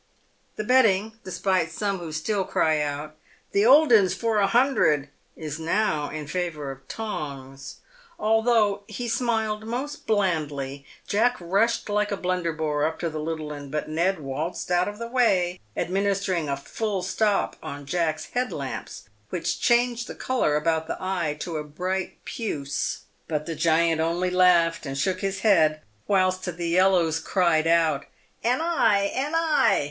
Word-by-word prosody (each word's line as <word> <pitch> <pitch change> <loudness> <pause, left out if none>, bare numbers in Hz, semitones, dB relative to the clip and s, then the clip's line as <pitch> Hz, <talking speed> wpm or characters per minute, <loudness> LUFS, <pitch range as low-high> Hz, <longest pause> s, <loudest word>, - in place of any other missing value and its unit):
The 215 - -3
betting, 220 -3 +3
despite 185 -2 0
some 200 +2 -2
who 170 -2 -6
still 190 +6 -1
cry 155 -4 +1
out, 150 +1 -4 0.2
" - - -34
The 205 +3 +3
old 290 0 +7
'un 200 -4 +6
for 225 +2 0
a 200 - +3
hun 250 +7 +3
dred," 145 - +2 0.3
is 155 -1 -5
now 160 -3 0
in 155 0 -5
favour 155 -3 -3
of 135 0 -13
Tongs. 140 -10 -6 0.4
Although 220 -2 +2
he 240 +2 -5
smiled 225 -3 0
most 260 +6 -5
blandly, 150 -9 -1 0.2
Jack 240 +4 +2
rushed 200 +7 +1
like 210 0 0
a 200 - -1
Blunderbore 165 -5 -1
up 160 +1 0
to 170 -2 -1
the 155 - -4
little 155 -1 -4
'un, 145 -1 -8
but 150 +2 -3
Ned 170 +4 +1
waltzed 150 +6 -4
out 180 0 +3
of 205 0 -5
the 235 - -5
way, 190 -8 +2 0.2
administering 190 -4 0
a 140 - -1
"full 195 +6 -3
stop" 205 +2 +1
on 145 0 -7
Jack's 160 0 -1
"head 250 +1 -1
lamps," - - -6 0.3
which - - -2
changed 240 0 +2
the - - -7
colour 250 -13 0
about 160 +1 0
the - - -3
eye 175 -6 -2
to 170 -3 -3
a 150 - -3
bright 180 +5 -4
puce. 145 - -3 0.3
But 150 -2 -2
the 165 - -3
giant 165 0 +2
only 175 +3 0
laughed 175 -4 +3
and 135 0 -4
shook 185 +6 0
his 195 0 -2
head, 160 -8 +4 0.3
whilst 185 -2 +2
the 175 -1 -3
yellows 175 -2 +3
cried 170 -4 +2
out, 165 -4 +2 0.4
"An 250 +5 +2
eye! 215 -12 +2
an 290 +5 -1
eye!" 325 -2 +3
180 Hz, 165 wpm, -25 LUFS, 155-210 Hz, 0.4 s, old